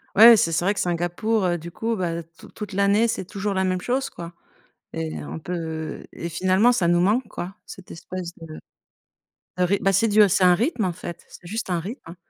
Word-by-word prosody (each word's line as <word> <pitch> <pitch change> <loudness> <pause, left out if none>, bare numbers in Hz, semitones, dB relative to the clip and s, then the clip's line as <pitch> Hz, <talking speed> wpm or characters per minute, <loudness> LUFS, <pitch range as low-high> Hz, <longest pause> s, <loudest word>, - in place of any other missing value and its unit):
Ouais, 225 +2 +10
c'est 165 - +2
c 165 +3 0
vrai 200 - +3
que - - -5
Singapour, 175 +2 0
du 170 +1 -9
coup, 225 +4 -2
bah 170 -3 -2
tout - - -14
toute 210 -2 -8
l'année, 200 +4 +3
c'est 205 - -3
toujours 200 +1 -3
la 190 0 0
même 185 -1 0
chose 265 +4 -1
quoi 170 0 -9 0.6
et 80 -1 -4
on 80 +3 -6
peut 160 - -5
et 170 - -5
finalement, 185 +7 +3
ça 180 -8 +1
nous 175 0 +3
manque 215 +7 +2
quoi, 185 +3 -6
cette 185 - -12
espèce 175 +1 -7
de 155 -1 -9 1.0
de 180 - +2
ryt 195 +3 +2
Bah 195 - +3
c'est 225 +5 +3
du 210 0 +5
c'est 190 0 +2
un 180 -1 +6
rythme 230 - 0
en 175 - -1
fait, 170 - -8
c'est 175 - -13
juste 220 +3 -4
un 175 -2 0
rythme, 215 - -7
hein. 170 - -10
185 Hz, 220 wpm, -23 LUFS, 170-210 Hz, 1.0 s, Ouais